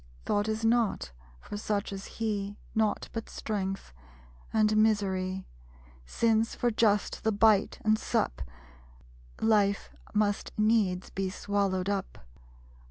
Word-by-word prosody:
Thought 205 +1 +1
is 220 +1 -1
not 225 - +1 0.3
for 205 - -7
such 205 -1 -2
as 195 0 -6
he; 205 -2 -2 0.2
Naught 220 -1 +1
but 225 -1 -5
strength, 195 - -4 0.6
and 215 -1 +3
misery; 190 -3 +1 0.6
Since, 225 - +1
for 240 - +1
just 215 -2 +1
the 220 - +2
bite 210 -1 +4
and 215 0 +4
sup, - - -1 1.0
Life 205 -2 +2 0.2
must 210 -1 0
needs 215 -4 +2
be 195 -1 -2
swallowed 195 -1 -1
up. 200 -2 -2
205 Hz, 115 wpm, -29 LUFS, 195-220 Hz, 1.0 s, bite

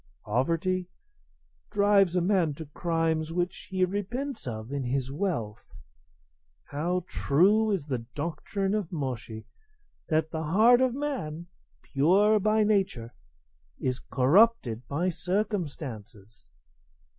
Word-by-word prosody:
Poverty 170 - 0 0.8
drives 200 -3 +3
a 180 - +3
man 175 -5 +1
to 160 - -8
crimes 160 +1 -1
which 175 +1 -3
he 185 -1 +2
repents 215 - -4
of 110 +1 -5
in 140 -1 -2
his 130 +1 -2
wealth. 140 - -4 0.9
How 170 +5 -2
true 200 +9 +3
is 190 -8 -1
the 130 -5 -2 0.2
doctrine 190 +6 -2
of 210 -6 -2
Moshi 130 -8 -4
[Mencius], 110 0 -8 0.6
that 160 0 +1
the 160 - -3
heart 220 +10 +5
of 255 -1 +2
man, 245 - -4 0.4
pure 195 +10 +3
by 215 +2 +3
nature, 190 - 0 0.6
is 125 -1 -2
corrupted 135 - +3
by 170 +6 0
circumstances!" 140 - -4
170 Hz, 115 wpm, -28 LUFS, 140-200 Hz, 0.9 s, heart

